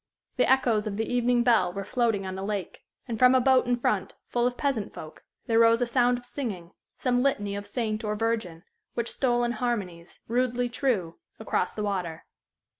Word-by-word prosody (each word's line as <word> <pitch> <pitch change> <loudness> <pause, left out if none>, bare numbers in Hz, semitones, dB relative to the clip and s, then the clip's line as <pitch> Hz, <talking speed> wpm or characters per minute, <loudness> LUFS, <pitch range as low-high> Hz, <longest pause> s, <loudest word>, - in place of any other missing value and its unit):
The 250 - +3
echoes 235 -5 +2
of 200 -1 -3
the 225 - 0
evening 245 0 +2
bell 225 -7 +3
were 200 +2 -5
floating 220 -2 0
on 190 - -4
the 190 - -5
lake, 200 -2 -4 0.2
and 230 -3 -4
from 255 0 +6
a - - +6
boat 255 0 +4
in 245 - +3
front, 240 - -1
full 240 0 +1
of 245 - -4
peasant 265 -8 -2
folk, 155 0 -10 0.2
there 225 0 +2
rose 230 0 +5
a 245 - +2
sound 245 0 +2
of 245 - -8
singing, 210 -10 -5 0.3
some 245 -1 +1
litany 205 -7 0
of 205 0 -6
saint 220 0 -2
or 210 -1 -1
virgin, 215 -7 -2 0.3
which 235 -1 -2
stole 240 -2 +1
in 240 - +1
harmonies, 200 -9 -4
rudely 245 +1 0
true, 230 -10 -1 0.2
across - - -1
the 210 - -3
water. 180 -6 -3
230 Hz, 195 wpm, -27 LUFS, 200-245 Hz, 0.3 s, from